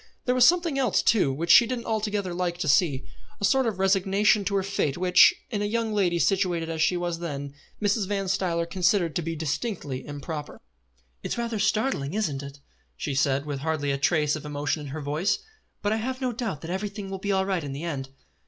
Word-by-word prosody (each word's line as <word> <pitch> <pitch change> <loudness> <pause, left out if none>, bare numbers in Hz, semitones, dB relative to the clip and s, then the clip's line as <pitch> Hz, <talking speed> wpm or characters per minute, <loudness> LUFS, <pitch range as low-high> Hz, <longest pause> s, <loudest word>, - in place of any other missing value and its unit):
There 250 - +2
was 250 -1 +6
a - - +8
something 340 -5 +2
else 250 -7 +2
too, 200 -11 +3
which 165 +5 0
she 235 - +8
didn't 240 -1 -4
altogether 210 -4 -1
like 175 -1 -2
to 175 - -3
see, 145 -2 +2 0.3
a 200 - +1
sort 265 +3 +3
of 215 -5 -2
resignation 195 +2 +3
to 200 +1 -1
her 195 - +1
fate 185 -8 -1
which, 180 0 +6 0.2
in 210 -3 -1
a - - 0
young 225 +1 -1
lady 185 -4 +2
situated 175 -3 +1
as 160 -1 -3
she 170 +3 +3
was 175 -1 -2
then, 140 -4 -5 0.3
Mrs. 205 -1 +1
Van 195 -1 -2
Stuyler 180 -3 0
considered 180 -2 +1
to - - 0
be 165 0 -3
distinctly 155 - -3
improper. 145 +1 -6 0.6
"It - - -3
is - - -5
rather 235 -2 -2
startling, 210 - 0
isn't 155 -11 -1
it?" 140 0 -10 0.4
she 140 - -3
said, 135 +1 +1
with 145 -2 -4
hardly 145 -1 -1
a 140 - 0
trace 150 0 +2
of 155 - -7
emotion 145 +1 -2
in 145 - -7
her 150 +3 -5
voice; 150 +7 0 0.5
"but 205 +1 +1
I - - 0
have 255 +3 -3
no 255 -2 -1
doubt 220 - -4
that 165 - -6
everything 200 +1 -4
will 195 - -4
be 200 +1 -2
all 190 -1 +2
right 190 -4 -1
in 140 - -5
the 140 +4 -6
end." 140 -6 -4
180 Hz, 225 wpm, -26 LUFS, 150-205 Hz, 0.6 s, a